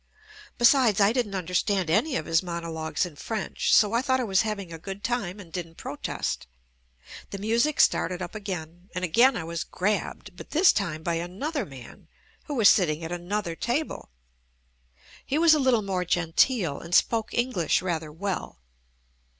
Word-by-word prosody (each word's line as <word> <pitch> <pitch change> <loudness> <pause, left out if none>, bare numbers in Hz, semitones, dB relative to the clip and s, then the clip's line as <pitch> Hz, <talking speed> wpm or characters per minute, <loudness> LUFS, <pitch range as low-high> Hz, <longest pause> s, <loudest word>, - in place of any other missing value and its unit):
Besides 240 -4 +5
I 200 +2 +4
didn't 235 -6 -1
understand 185 +1 0
any 260 - +2
of - - -2
his 165 0 +2
mono 170 -2 -5
logues 160 +2 -2
in 170 -4 -9
French 215 +7 -2
so 210 0 +5
I 235 - +3
thought 260 -1 +1
I - - 0
was 195 -5 +2
having 200 -5 -4
a 165 - -8
good 195 +4 -8
time 210 -6 -2
and 170 -5 -12
didn't 165 -2 -5
protest, - - -4 0.4
— - - -16
the 200 - -5
music 230 +9 +1
started 180 +1 +3
up 180 -2 -6
again, 180 -4 -7
and 180 0 -1
again 235 +9 +4
I - - -4
was 165 0 -4
"grabbed" 210 +3 -3
but - - -11
this 335 +4 +5
time 165 -7 -2
by 170 - 0
another 220 - -4
man 130 -4 -13 0.4
who 295 - -4
was 225 -5 +5
sit 185 -4 +5
ting 155 +2 -3
at 165 - -5
another 175 0 -3
table. 250 - -3 1.1
He 280 - -1
was 330 0 +6
a 305 - +3
little 255 -5 +3
more 190 -2 -1
genteel 175 - +1
and 170 +2 -2
spoke 225 -2 +2
English 220 - +1
rather 160 -4 -3
well. 190 +4 -4
190 Hz, 180 wpm, -26 LUFS, 170-230 Hz, 1.1 s, was